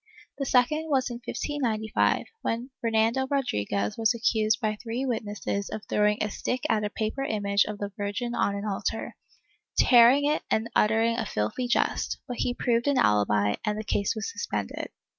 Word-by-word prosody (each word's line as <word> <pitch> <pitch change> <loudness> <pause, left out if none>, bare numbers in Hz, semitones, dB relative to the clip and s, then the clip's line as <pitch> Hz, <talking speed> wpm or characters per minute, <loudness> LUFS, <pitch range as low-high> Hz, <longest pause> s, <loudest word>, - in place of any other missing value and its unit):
The 275 - -2
second 305 +6 +2
was 265 -3 +1
in 240 - -6
1595, 225 -9 0 0.2
when 235 +4 -3
Fernando 230 +3 +1
Rodriguez 105 - -1
was 225 +1 +3
accused 220 -1 +2
by 215 -3 -1
three 245 +3 -3
witnesses 210 -4 -3
of 215 - -6
throwing 210 0 +2
a 210 - -2
stick 250 +5 -2
at 215 -2 +1
a 210 - -1
paper 220 +6 -3
image 200 -5 +1
of 210 -1 -5
the 205 0 -4
Virgin 205 +4 -3
on 200 -4 +1
an 200 +1 -4
altar, 210 +2 -3 0.6
tearing 250 +3 +6
it 300 +1 +1
and 220 +1 0
uttering 225 +2 +3
a 225 - -1
filthy 110 - -2
jest, 240 - 0
but 245 - -5
he 245 - -1
proved 235 +1 +1
an 285 -2 +3
alibi 105 - +3
and 210 -1 -1
the 215 - -3
case 200 -1 0
was 220 - -3
suspended. 475 - -4
225 Hz, 175 wpm, -27 LUFS, 210-245 Hz, 0.6 s, tearing